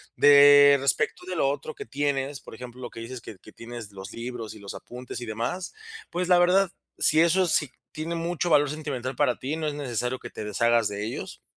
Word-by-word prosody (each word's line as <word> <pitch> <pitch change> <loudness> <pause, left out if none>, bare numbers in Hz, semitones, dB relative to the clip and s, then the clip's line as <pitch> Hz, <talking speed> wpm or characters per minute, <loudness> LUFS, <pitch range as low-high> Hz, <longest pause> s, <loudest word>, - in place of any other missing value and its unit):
De 145 0 +8
respecto 135 +5 0
de 185 - -3
lo 135 -4 +2
otro 295 - -4
que 420 0 -8
tienes, 140 -1 -2
por - - -11
ejemplo, 125 +1 -8
que 115 - -10
dices 120 +1 -7
que 105 - -10
que 110 - -16
tienes 115 -2 -9
los 95 -1 -9
libros 115 -2 -6
y - - -12
los 100 0 -8
apuntes 125 0 -8
y - - -5
demás, 120 +12 -3 0.4
pues 180 +1 -2
la 180 -1 +5
verdad, 180 +1 +4 0.3
si 155 +1 +4
eso 180 +2 +4
sí 150 -3 +1 0.2
tiene 160 +2 -4
mucho 170 +1 -2
valor 145 -2 +4
sentimental 135 -4 -4
para 135 -4 +1
ti, 140 +4 -3
no 155 -1 -2
es 145 - -3
necesario 125 -2 -2
que 120 - -8
te - - -7
deshagas 115 +2 +2
de 105 +1 -4
ellos. 115 - -6
135 Hz, 215 wpm, -26 LUFS, 120-155 Hz, 0.4 s, De